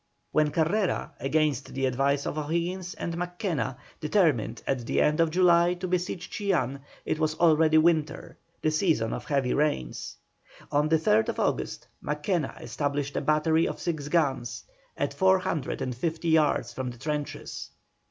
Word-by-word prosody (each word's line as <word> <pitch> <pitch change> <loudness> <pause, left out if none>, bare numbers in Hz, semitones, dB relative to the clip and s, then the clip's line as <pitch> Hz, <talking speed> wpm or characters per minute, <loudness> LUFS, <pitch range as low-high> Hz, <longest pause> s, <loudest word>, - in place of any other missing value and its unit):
When 155 -1 +3
Carrera, 175 +6 0
against 145 -2 0
the 135 0 0
advice 135 +2 +1
of - - -3
O'Higgins 170 +4 -2
and 170 - -4
Mackenna, 175 - -2 0.2
determined 150 - +1
at 125 -4 -2
the - - +1
end 150 +1 +3
of 165 -1 +4
July 175 0 +4
to 180 +1 -4
besiege 180 0 -2
Chillán, 150 - -1 0.3
it 155 - -1
was 155 -1 +1
already 160 -1 +4
winter, 155 -1 +1 0.3
the 155 - +3
season 155 - +1
of - - -5
heavy 140 -3 +1
rains. 140 - -1 0.6
On 150 +1 +2
the 160 - +5
3rd 110 -8 +2
August, - - -1 0.2
Mackenna 150 +1 -2
established 140 +3 -2
a - - 0
battery 155 +2 +2
of - - -5
six 155 -4 -3
guns, 145 -7 0 0.3
at - - -1
four 190 0 +4
hundred 185 -7 -2
and 130 - -2
fifty 165 +5 -2
yards 150 -7 +2
from 130 +1 -3
the 120 - -9
trenches. 150 +2 -4
155 Hz, 155 wpm, -27 LUFS, 140-170 Hz, 0.6 s, the